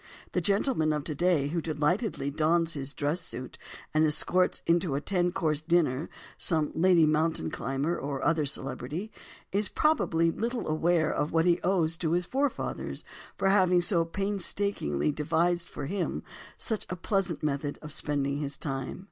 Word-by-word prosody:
The - - 0
gentleman 200 - +2
of 150 -1 -2
today 155 -2 +1
who 170 +2 -1
delightedly 155 - 0
dons 165 +3 +2
his 140 -2 -4
dress 150 +4 -1
suit 130 +1 -6 0.3
and 155 0 +4
escorts 180 +4 +2
into 170 -3 +2
a - - +1
ten 180 +2 0
course 155 -4 0
dinner 155 -4 +1 0.3
some 155 -3 +2
lady 170 -1 +5
mountain 155 - +1
climber 135 +7 -2
or 140 -1 -3
other 160 -3 +2
celebrity, 145 - -3 0.4
is 205 +2 +2
probably 165 - +2
little 235 +6 -3
aware 160 0 +2
of 150 - -1
what 165 0 +3
he 175 0 +3
owes 170 -3 +1
to 165 -2 0
his 175 0 +1
forefathers 275 +6 -2 0.3
for 195 - +2
having 185 -2 +4
so 175 -1 +2
painstakingly 195 - -1
devised 170 +4 0
for 140 - -6
him 185 +4 -2 0.3
such 220 -3 -3
a 180 - -2
pleasant 185 -2 -1
method 145 -1 -1
of 150 - -7
spending 140 -2 -1
his 140 -1 -3
time. 135 0 -4
165 Hz, 155 wpm, -29 LUFS, 150-180 Hz, 0.4 s, lady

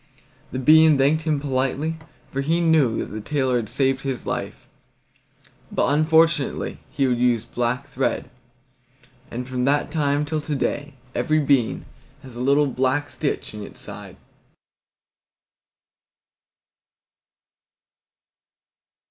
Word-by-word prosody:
The - - -4
bean 155 +3 +6
thanked 150 +4 +2
him 150 -2 +2
politely, 140 +3 -1 0.3
for 135 - -2
he 165 +5 +1
knew 155 -9 +3
that - - -4
the 110 - -5
tailor 130 0 0
had 110 -3 -3
saved 135 -1 +1
his 135 -2 -4
life, - - -4 1.0
but - - +1
unfortunately 160 -1 +2
he 140 - -1
had 125 -2 +3
used 120 -2 +1
black 125 +3 -1
thread, 135 -1 -2 1.0
and 125 +1 -5
from 125 -1 -1
that 145 +2 +1
time 145 -2 +1
till 155 +1 -2
to 150 0 -3
day 145 +1 -2 0.2
every 155 -1 +1
bean 140 -6 +1 0.4
has 130 -3 -11
a 120 - -5
little 140 +3 +3
black 135 +2 0
stitch 145 - -3
in 105 - -7
its 100 - -9
side. - - -9
140 Hz, 120 wpm, -23 LUFS, 130-150 Hz, 1.0 s, bean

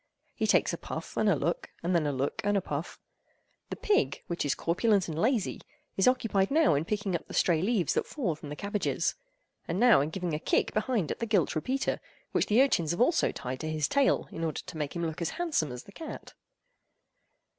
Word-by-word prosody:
He - - -1
takes - - +3
a - - -4
puff - - -6
and - - +2
a - - +4
look, - - -2
and 175 +2 0
then 165 -4 +2
a - - +1
look 140 +10 -2
and 205 0 +2
a - - +1
puff. 150 0 -5 0.7
The - - -3
pig—which 405 - 0
is 145 - +1
corpulent 195 +3 +2
and 160 0 -3
lazy—is 220 -3 -1
occupied 220 -6 +2
now 310 - +4
in 145 +3 0
picking 205 -1 -1
up 170 - -4
the - - -7
stray 165 -3 +3
leaves 195 -4 +1
that - - 0
fall 230 - -1
from 150 -1 -10
the 145 - -5
cabbages, 205 +5 -1 0.5
and 170 +3 -1
now 235 - +6
in 145 - -1
giving 175 -1 -3
a 150 - -1
kick - - +1
behind 215 - 0
at - - -4
the 230 - -2
gilt 200 -7 +2
repeater, 260 - -1 0.3
which - - +1
the 230 +5 +5
urchins 170 - +1
have 175 +7 0
also 325 +7 +3
tied 130 +1 -5
to 155 - -3
his 155 -2 0
tail 280 -1 +2
in 165 - -5
order 160 -2 -2
to 185 - -9
make 150 0 -3
him 170 -1 -1
look 160 +1 -4
as 170 - 0
handsome 310 - 0
as 125 0 -7
the - - -15
cat. 320 +10 -8
185 Hz, 220 wpm, -29 LUFS, 155-230 Hz, 0.7 s, now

